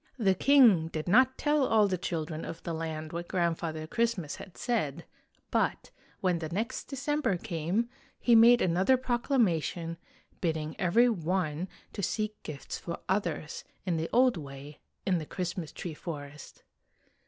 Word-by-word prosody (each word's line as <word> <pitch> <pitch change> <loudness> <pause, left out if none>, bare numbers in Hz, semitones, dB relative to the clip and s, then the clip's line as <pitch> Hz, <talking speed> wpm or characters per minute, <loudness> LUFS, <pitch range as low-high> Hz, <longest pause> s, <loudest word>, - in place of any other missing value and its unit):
The 200 -6 +3
king 225 - +6
did 155 0 -5
not 255 +7 +5
tell 295 -1 +2
all 220 -4 +4
the 190 - 0
children 165 -3 -3
of 165 - -7
the 170 - -3
land 160 -1 -4
what 170 +1 -4
Grandfather 165 -3 -1
Christmas 220 -5 -1
had 185 - -11
said, 215 - -1 0.5
but, - - 0 0.3
when 180 -2 +1
the 160 -2 -4
next 225 +9 -3
December 275 -6 -1
came, 180 +4 -1 0.3
he 240 - +3
made 235 +2 +7
another 185 +9 +3
proclama 240 - +1
tion, 165 +1 -5 0.4
bidding 160 -3 -2
every 210 +7 +4
one 180 -5 -1 0.3
to 200 - -4
seek 215 +2 -2
gifts 145 -3 -6
for 170 - -5
others, 175 -5 -2 0.2
in 175 -3 0
the 160 +1 -2
old 250 -3 +4
way, 140 0 -9 0.3
in 185 -3 +2
the 155 - -6
Christmas 180 -3 -4
tree 170 - -6
forest. 150 -3 -8
180 Hz, 155 wpm, -30 LUFS, 160-230 Hz, 0.5 s, made